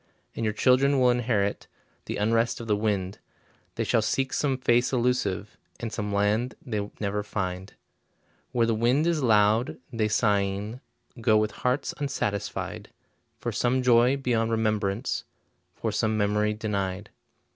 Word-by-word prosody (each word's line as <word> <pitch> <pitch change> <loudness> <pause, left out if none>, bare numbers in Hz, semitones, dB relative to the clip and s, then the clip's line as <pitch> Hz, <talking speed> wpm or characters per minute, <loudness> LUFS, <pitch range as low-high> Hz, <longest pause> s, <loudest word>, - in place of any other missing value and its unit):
And - - -3
your 110 -1 0
children 135 +4 +3
will 125 -1 +5
inherit 110 -5 0 0.4
The - - -4
unrest 115 +3 +1
of 115 - -6
the 105 -2 +2
wind, 100 -2 -1 0.6
They - - -1
shall 115 - +2
seek 135 +5 -1
some 135 -3 +1
face 120 -1 +2
elusive, 120 -6 0 0.2
And 115 -2 -5
some 105 -2 -3
land 105 +5 +1
they 105 -4 -4
never 105 0 -1
find. 95 -1 -4 0.8
Where 120 -1 +2
the 115 - +1
wind 120 +7 +2
is 170 -3 +1
loud, 110 0 +3 0.2
they 110 -2 +1
sighing 105 +1 0 0.4
Go 110 -1 +4
with 110 0 +1
hearts 125 +3 -1
unsatisfied, 120 -8 -3 0.5
For - - -3
some 125 +1 +1
joy 125 +2 +5
beyond 120 -4 0
remembrance, 110 0 0 0.5
For - - -2
some 110 -1 0
memory 105 +1 +1
denied. 100 -2 -3
110 Hz, 145 wpm, -26 LUFS, 105-125 Hz, 0.8 s, will